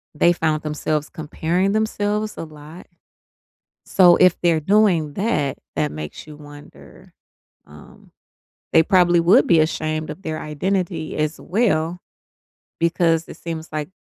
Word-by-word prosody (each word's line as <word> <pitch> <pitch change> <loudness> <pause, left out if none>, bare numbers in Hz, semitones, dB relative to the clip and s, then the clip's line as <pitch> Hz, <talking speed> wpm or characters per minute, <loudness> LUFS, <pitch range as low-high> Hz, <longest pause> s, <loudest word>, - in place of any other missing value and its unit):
they 170 +3 +4
found 155 -2 -1
themselves 150 0 -2
comparing 170 +5 -2
themselves 215 0 -1
a - - -5
lot. 155 +3 -13 1.0
So 175 -2 +5
if 185 -1 +4
they're 170 -2 +2
doing 180 -5 +2
that, 190 - -1 0.2
that 75 -1 -1
makes 75 0 -8
you 150 -1 -12
wonder, 145 -1 -15 0.5
um, 75 0 -17 0.6
they 160 - +7
probably 175 -2 +3
would 170 +3 +5
be 170 -3 +4
ashamed 155 0 -1
of 160 +6 -9
their 155 -1 -4
identity 165 +1 -3
as 155 0 -2
well, 175 -4 0 0.8
because 165 -1 +1
it - - -10
seems 165 -1 -6
like 150 +1 -4
160 Hz, 135 wpm, -21 LUFS, 155-180 Hz, 1.0 s, they